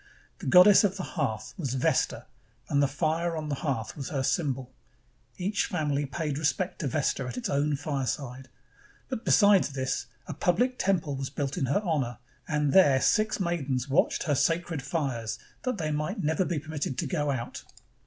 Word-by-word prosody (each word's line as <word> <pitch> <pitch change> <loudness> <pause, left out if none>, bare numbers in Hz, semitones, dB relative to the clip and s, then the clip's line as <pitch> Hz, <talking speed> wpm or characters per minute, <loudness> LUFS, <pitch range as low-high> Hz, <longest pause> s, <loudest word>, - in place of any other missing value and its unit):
The - - -6
goddess 180 +9 +8
of 195 -1 +1
the 185 - -4
hearth 135 -13 -3
was 135 -6 -2
Vesta, 130 - +1 0.4
and 140 -1 +2
the 140 - +4
fire 160 +4 -1
on 155 -1 -4
the - - -1
hearth 120 -7 -2
was 140 -3 -5
her 135 -3 -1
symbol. 135 -4 -1 0.6
Each 200 +3 0
family 145 -4 -1
paid 150 0 -3
respect 175 +4 -1
to 150 - -1
Vesta 135 -2 0
at 125 0 -6
its 125 - -3
own 145 +1 +1
fireside; 135 -2 -3 0.6
but 255 -4 -4
besides 200 - +5
this, 130 -3 -2 0.2
a - - -5
public 245 +9 +1
temple 165 -7 +1
was 135 0 -4
built 140 -1 -3
in 135 - -1
her 140 - +1
honor, 135 -8 -1 0.3
and 150 -2 +1
there 145 -9 +6
six 215 +8 +2
maidens 140 -8 -1
watched 140 - +2
her 155 -5 +1
sacred 165 +1 0
fires 135 -6 -2 0.3
that 255 -3 -1
they 155 -4 -2
might 155 +7 -2
never 160 +4 +1
be 175 - -1
permitted 150 -3 -4
to - - -1
go 150 -5 -1
out. 125 -4 -4
150 Hz, 180 wpm, -28 LUFS, 135-175 Hz, 0.6 s, goddess